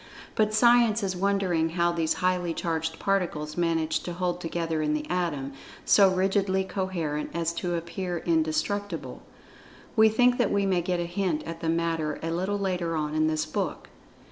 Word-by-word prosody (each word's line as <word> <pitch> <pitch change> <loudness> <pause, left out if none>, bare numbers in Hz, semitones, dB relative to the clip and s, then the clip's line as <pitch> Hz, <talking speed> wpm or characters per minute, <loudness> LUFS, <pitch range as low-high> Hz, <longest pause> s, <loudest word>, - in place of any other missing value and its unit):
But 215 -1 +2
Science 230 -1 +4
is 190 -1 -1
wondering 185 -4 +1
how 170 +1 +1
these 165 -2 0
highly 180 -2 0
charged 160 -1 -2
particles 165 -6 -1
manage 165 -2 +1
to 175 - -6
hold 180 0 -2
together 165 -1 -2
in 150 0 +1
the 150 0 -4
Atom, 150 -7 -2 0.3
so 200 -2 +6
rigidly 190 +1 +1
coherent 180 -6 -3
as 170 0 0
to 175 +1 -2
appear 175 +1 -3
indestructible. 165 +3 -1 0.7
We 220 -1 +6
think 245 +3 +3
that 240 - +3
we 200 -1 +2
may 185 -2 +2
get 180 +1 -1
a 175 - -1
hint 175 -2 -1
at 165 0 -7
the 165 - -2
matter 165 -2 -1
a 165 - -2
little 190 +4 -1
later 180 -4 -1
on 150 -1 -2
in 155 0 +2
this 155 0 0
book. 155 - -4
175 Hz, 170 wpm, -27 LUFS, 160-190 Hz, 0.7 s, so